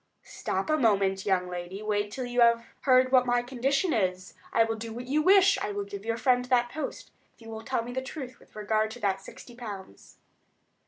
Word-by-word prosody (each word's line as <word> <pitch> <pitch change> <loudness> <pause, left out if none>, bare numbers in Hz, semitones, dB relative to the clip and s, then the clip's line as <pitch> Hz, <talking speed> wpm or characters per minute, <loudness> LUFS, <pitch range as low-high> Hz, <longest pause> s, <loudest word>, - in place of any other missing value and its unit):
"Stop - - -3
a 310 - +3
moment, 195 -6 +2
young 185 -2 +2
lady; 180 +3 -6
wait 205 -1 0
until 250 +5 -6
you 245 0 0
have 235 0 +4 0.2
heard 255 -1 +5
what 255 -1 +5
my 245 0 +2
condition 270 +7 0
is. 185 -3 -1 0.2
I 225 - +4
will 225 0 -2
do 225 +1 -7
what 240 +2 -6
you 290 +4 +1
wish—I 385 - +4
will 205 0 -2
give 200 +1 -8
your 230 0 -1
friend 250 +1 +2
that 245 -1 +2
post—if 310 - -8
you 225 -1 -11
will 220 0 -6
tell 235 0 -2
me 240 - -7
the 260 - -2
truth 260 -1 -8
with - - -22
regard 215 +1 0
to 230 +3 -9
that 195 -1 0
sixty 240 - -12
pounds." 205 - -10
230 Hz, 210 wpm, -28 LUFS, 205-255 Hz, 0.2 s, heard